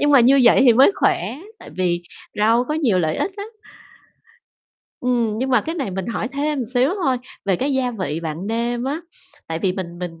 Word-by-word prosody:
Nhưng 290 - +3
mà 275 -3 +7
như 265 +3 +5
vậy 240 - +6
thì 245 - +7
mới 265 - +6
khỏe 360 - 0 0.2
tại - - -12
vì 175 -2 -1 0.4
rau 230 +4 +3
có 300 - 0
nhiều 250 -12 +2
lợi 160 -2 0
ích 390 - -2
lắm. 405 +2 -5 1.5
Ừm, 240 -4 0
nhưng 260 +2 -1
mà 250 -3 +4
cái 325 +9 -5
này 275 - -3
mình 190 0 -4
hỏi 230 0 -3
thêm 285 -1 -1
xíu 255 +5 +3
thôi 260 -2 +2 0.3
về 195 -3 +1
cái 275 +2 -1
gia 260 -2 0
vị 165 -8 -4
bạn 165 +3 -5
nêm 235 +2 -1
á, 290 +4 -2 0.5
tại 160 0 -3
vì 185 +2 0
mình 175 -2 -6
mình 165 -2 -6
240 Hz, 210 wpm, -21 LUFS, 185-270 Hz, 1.5 s, mà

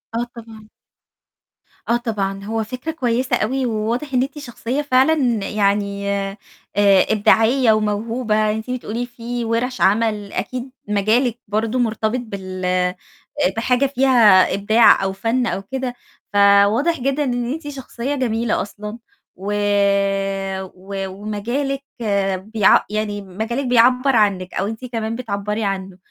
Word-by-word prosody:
آه 235 - 0
طبعًا. 220 -2 -12 1.2
آه 235 - +4
طبعًا 200 -4 -3
هو 225 +1 -1
فكرة 255 +8 -5
كويسة 250 -4 0
أوي، 260 +4 -1
وواضح 235 +5 -2
إن 250 - +3
أنتِ 275 +2 -6
شخصية 245 +1 -3
فعلًا 270 +1 +3 0.4
يعني 200 -1 0
آآ، 195 0 -2 0.8
إبداعية 225 +3 +4
وموهوبة، 215 +1 0
أنتِ 220 +3 -5
بتقولي 245 -1 -3
في 240 0 -5
ورش 240 +3 -1
عمل 210 0 +1
أكيد 250 +6 -4 0.2
مجالِك 220 +4 +1
برضه 220 +4 -1
مرتبط 225 +1 0
بال 185 -4 -2 0.6
بحاجة 250 +3 +2
فيها 250 -8 +5
إبداع 215 +2 +5
أو 190 0 -1
فن 230 +5 0
أو 195 - -2
كده، 255 +4 -4 0.4
فواضح 205 +10 +4
جدًا 275 +3 0
إن 245 -1 -1
أنتِ 315 -1 -7
شخصية 270 -1 -4
جميلة 235 -3 0
أصلًا، 210 +3 -7 0.4
و 200 +3 -4 1.2
و 195 +1 -5
ومجالِك 230 +8 -3 0.7
بيع 210 -3 +5
يعني 210 -1 -2
مجالِك. 220 +8 -4
بيعبّر 250 +2 +4
عنِك 195 -4 +1
أو 195 - -1
أنتِ 225 +4 -6
كمان 225 -2 -3
بتعبّري 210 -2 -3
عنه، 195 -2 -3
225 Hz, 125 wpm, -20 LUFS, 205-250 Hz, 1.2 s, فيها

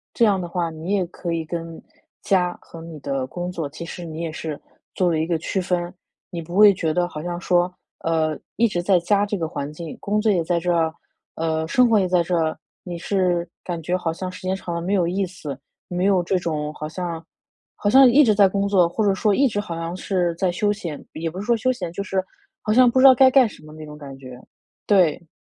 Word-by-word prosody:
这 235 - +4
样 200 -3 +3
的 175 - -4
话， 170 -1 -2
你 165 +4 -4
也 195 -3 +1
可 170 0 -5
以 165 -1 -1
跟 165 0 -6 0.4
家 180 -2 +1
和 165 - -12
你 165 -2 -9
的 135 -1 -2
工 175 +6 -5
作 165 -4 -3
其 155 +4 -8
实 175 +1 -7
你 160 0 -6
也 165 -1 -3
是 155 -1 -5 0.3
做 180 -2 +1
了 160 - 0
一 160 - -1
个 170 -2 +1
区 190 - -2
分。 180 -1 -2 0.4
你 170 -2 -5
不 170 +2 -8
会 210 -1 +8
觉 165 -4 -1
得 175 +1 +1
好 150 -3 -7
像 175 +1 -4
说， 180 0 +2 0.3
呃， 160 -2 0 0.2
一 235 - +3
直 180 -5 -2
在 180 0 +3
家 200 +4 +2
这 205 0 -2
个 165 - -2
环 145 -1 -5
境， 160 0 -8
工 210 +1 0
作 215 0 +3
也 175 -4 +1
在 170 +1 0
这 175 +1 0
儿， 160 -1 +1 0.4
呃， 160 -1 -1
生 250 +7 +4
活 220 -2 +5
也 185 - +1
在 180 -1 +2
这 175 +1 -1
儿， 160 -1 0 0.3
你 175 -2 -6
是 180 -1 0 0.2
感 170 -2 -4
觉 175 +3 -1
好 170 -3 -2
像 185 +2 -5
时 185 - -11
间 185 +1 -1
长 180 -2 -6
了 170 - -2
没 185 +4 -1
有 180 -4 +2
意 190 +3 0
思， 160 -7 -7 0.3
没 180 +1 -1
有 195 -2 +4
这 185 +2 0
种 155 -3 -3
好 155 0 -6
像 170 -1 -5 0.5
好 205 - 0
像 265 +4 +8
一 280 +5 +6
直 220 -5 +4
在 200 -1 +6
工 200 +1 -1
作， 185 -4 +4
或 210 +5 -1
者 200 - +3
说 205 +2 +2
一 275 +6 +4
直 205 -4 -2
好 190 -5 -4
像 165 +1 -4
是 180 -2 -1
在 180 +1 0
休 205 +4 +1
闲 170 -8 -7
也 165 +1 -3
不 180 +4 -8
是 200 - -5
说 235 - +3
休 255 +4 +1
闲， 180 -9 -5
就 200 - -3
是 190 -1 -1 0.4
好 215 - 0
像 250 +1 +6
不 260 +2 +2
知 265 - +6
道 265 - +10
该 260 +1 +7
干 260 -2 +6
什 - - -15
么 155 - -13
那 155 0 -9
种 150 0 -10
感 140 -2 -10
觉， 130 -2 -11 0.5
对。 175 -4 +3
175 Hz, 275 characters per minute, -22 LUFS, 165-195 Hz, 0.5 s, 道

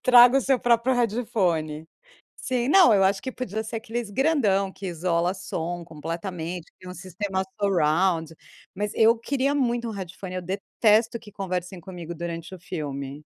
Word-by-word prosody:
Traga 250 +1 +8
o - - +1
seu 265 0 +2
próprio 240 +2 +3
headphone, 195 -10 0 0.5
sim 250 -1 -1
não 345 - +7
eu 195 -1 +4
acho 195 0 +2
que 260 - -4
podia 220 -4 -4
ser 225 +1 -5
aqueles 225 0 -4
grandão 205 -7 +2
que 195 - -8
isola 175 0 0
som 175 -2 -4
completamente, 165 +2 -5
que - - -
tem 185 - -11
um - - -8
sistema 190 +1 -3 0.2
surround, 170 -3 +2 0.4
mas 205 +2 -2
eu 225 +1 +5
queria 275 +3 0
muito 240 -4 0
um - - -3
headphone, 190 -2 -7
eu 185 - -3
detesto 215 +5 +1
que 220 -2 -14
conversem 180 -1 -4
comigo 170 -1 -8
durante 170 +1 -6
o - - -10
filme. 145 -4 -6
195 Hz, 165 wpm, -25 LUFS, 170-230 Hz, 0.5 s, Traga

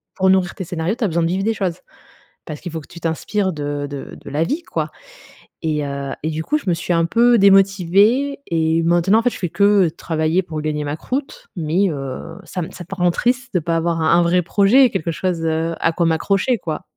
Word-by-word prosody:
pour 190 0 +2
nourrir 185 -2 +2
tes 190 - -5
scénarios, 175 +4 -2
tu 245 - -4
as - - +3
besoin 170 -1 0
de 165 - +2
vivre 190 +3 -1
des 225 +1 +1
choses. 185 -5 -3 0.7
Parce 150 - -7
qu'il 175 - -5
faut 160 - -4
que - - -15
tu 170 - -12
t'inspires 185 +4 -1
de 145 -1 -3
de 140 -1 -7
de - - -10
la 150 +3 0
vie, 295 - -2
quoi - - -3 0.7
et 150 -2 -1
heu, 140 -1 -4
et 160 - -1
du 160 +1 -3
coup, 300 - +1
je - - -13
me 175 - +3
suis 175 +1 -3
un 165 0 +2
peu 235 +7 +4
démotivée 200 +7 +4
et 165 0 +1
maintenant, 175 +5 +3
en - - +1
fait, 245 - +3
je - - -8
fais 180 - -2
que 200 -1 +4
travailler 160 +2 -1
pour 160 -3 -6
gagner 150 -1 -2
ma 145 +1 -3
croûte. 290 - -5
Mais, 170 +5 +1
heu, 135 -3 -6
ça 180 - -5
me - - -6
ça 175 - -9
peut 195 - -7
rendre 175 -1 +2
triste 245 +4 -1
de 180 - +4
pas 165 +1 -1
avoir 165 0 0
un 160 - +3
un - - +3
vrai 175 +1 +2
projet, 220 +8 +4
quelque 165 - -2
chose, 170 +1 -2
heu, 160 +1 0
à 165 - +2
quoi 170 - 0
m'accrocher, 195 +8 +1
quoi. 160 -3 -5
175 Hz, 240 wpm, -20 LUFS, 160-200 Hz, 0.7 s, peu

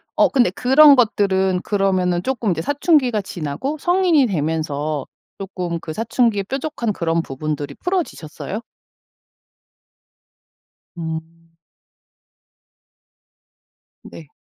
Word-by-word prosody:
어 - - +4
근데 255 -8 +3
그런 275 +7 +6
것들은 190 -6 +2
그러면은 185 -4 0
쪼끔 240 -5 -1
이제 160 -2 -1
사춘기가 275 - +2
지나고 190 - -4
성인이 350 -5 +3
되면서 155 - -2 0.3
쪼끔 180 -3 -4
그 160 - -7
사춘기의 225 0 0
뾰족한 265 -1 -3
그런 165 -2 0
부분들이 145 0 -5
풀어지셨어요? 230 - -4 2.4
음. 165 0 -7 2.5
네. 160 - -12
190 Hz, 220 characters per minute, -20 LUFS, 165-255 Hz, 2.5 s, 그런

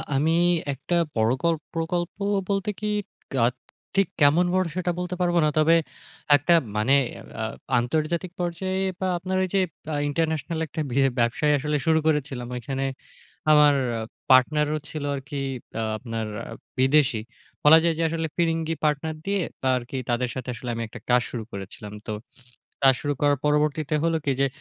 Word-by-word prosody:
আমি 155 +4 +2 0.4
একটা 140 +6 -2 0.2
পরকল্প 130 +9 +1
প্রকল্প 170 +1 -1 0.4
বলতে 195 0 0
কি 210 - -2 0.5
কাক 120 -2 +2 0.4
ঠিক 195 0 +3
কেমন 155 +5 +5
বড় 185 0 +2
সেটা 185 -1 0
বলতে 180 0 -3
পারবো 175 -1 +2
না। 150 - +3
তবে 155 +2 +5 0.6
একটা 145 +5 +3 0.2
মানে 110 +6 +3 0.5
আ - - -1 0.4
আন্তর্জাতিক 155 +8 -1
পর্যায়ে 185 +2 -2 0.2
বা 190 - 0
আপনার 185 +2 -2
ওই - - 0
যে, - - +5 0.3
আ - - 0
international 160 +1 -1
একটা 155 - -4
বি 120 - -4 0.2
ব্যবসায় 120 +6 +2
আসলে 150 +2 -1
শুরু 160 0 +4
করেছিলাম। 140 -5 0
ওইখানে 135 +3 -3 0.7
আমার 150 -1 +7 0.6
partner 150 +4 +5
ও - - -1
ছিল 155 -2 -5
আরকি 140 +1 -6 0.4
আ - - -1
আপনার 115 -1 -4 0.5
বিদেশী। 135 -2 +3 0.4
বলা 155 +2 +9
যায় 170 -1 +3
যে, - - 0
আসলে 165 0 -2
ফিরিঙ্গি 165 -1 0
partner 150 +1 0
দিয়ে 200 -1 +1 0.3
আরকি 125 +2 -5
তাদের 120 +1 +1
সাথে 130 -1 -6
আসলে 120 +1 -8
আমি 115 - -3
একটা - - -10
কাজ 125 0 +5
শুরু 115 -3 -4
করেছিলাম। 100 +1 -8
তো 110 - -3 0.7
কাজ 135 -1 +7
শুরু 145 -1 0
করার 145 -1 +3
পরবর্তীতে 150 0 +1
হলো 165 -1 +2
কি 140 - +2
যে, 140 - +4
150 Hz, 160 wpm, -25 LUFS, 130-165 Hz, 0.7 s, বলা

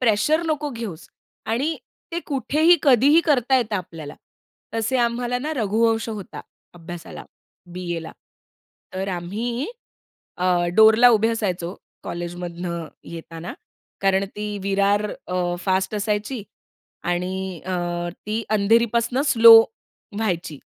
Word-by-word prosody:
Pressure 250 +8 +2
नको 300 -2 -1
घेऊस 220 -9 -7 0.4
आणि 270 +9 0 0.4
ते 340 - -2
कुठेही, 305 +4 +3
कधीही 280 +4 +5
करता 265 -4 +3
येतं 220 -4 0
आपल्याला. 165 -5 -7 0.6
तसे 225 +3 0
आम्हाला 240 +1 0
ना, 300 +5 -3
रघुवंश 225 +1 +1
होता 210 -4 -7 0.3
अभ्यासाला 175 0 -9 0.5
बीएला. 175 -2 -5 0.8
तर 190 +1 -3
आम्ही 215 +9 -3 0.7
अ, - - 0 0.3
डोअरला 220 +3 +7
उभे 225 0 +3
असायचो 190 -5 -2 0.3
कॉलेजमधन 175 -1 -5 0.2
येताना 165 0 -8 0.5
कारण 195 0 +2
ती 210 0 -3 0.2
विरार 200 +1 +2 0.2
अ, 180 -1 -1
फास्ट 190 +1 0
असायची. 210 +3 -2 0.6
आणि 180 0 -3
अ, 185 - -3 0.5
ती 215 +2 -1
अंधेरीपासून 230 +4 +2
स्लो 230 -3 +9 0.6
व्हायची, 175 -8 -2
210 Hz, 105 wpm, -22 LUFS, 180-235 Hz, 0.8 s, स्लो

